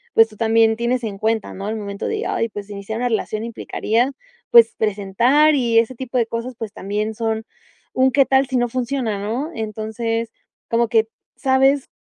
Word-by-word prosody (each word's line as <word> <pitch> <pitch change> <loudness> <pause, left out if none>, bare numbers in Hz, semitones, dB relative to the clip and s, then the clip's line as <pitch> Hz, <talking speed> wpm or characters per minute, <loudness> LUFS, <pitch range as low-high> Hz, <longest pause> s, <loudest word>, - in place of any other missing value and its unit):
pues 225 - +7
tú 215 - -16
también 225 0 +3
tienes 240 +2 -1
en 205 -3 -5
cuenta, 220 0 -1
¿no? 195 +1 -6
Al 220 - -2
momento 200 -2 -5
de, 440 0 -2
ay, 230 - -1
pues 205 -1 -8
iniciar 200 +2 -5
una 245 - 0
relación 220 -1 -2
implicaría, 230 +2 -1 0.4
pues 230 -1 +7
presentar 220 +9 +3
y 235 -4 +2
ese 230 +3 0
tipo 255 +1 -4
de 235 - +3
cosas, 230 +2 -5
pues, 220 -3 -6
también 210 +2 -3
son, 225 0 -2 0.5
¿un 260 0 +3
qué 275 +1 +4
tal, 265 0 +3
si 260 -1 -1
no 245 0 +2
funciona? 240 -3 -2
¿No? 245 +10 -3
Entonces, 220 +1 -3 0.4
como 235 0 +2
que 225 -1 +2 0.3
sabes, 270 0 +2
230 Hz, 185 wpm, -20 LUFS, 220-250 Hz, 0.5 s, pues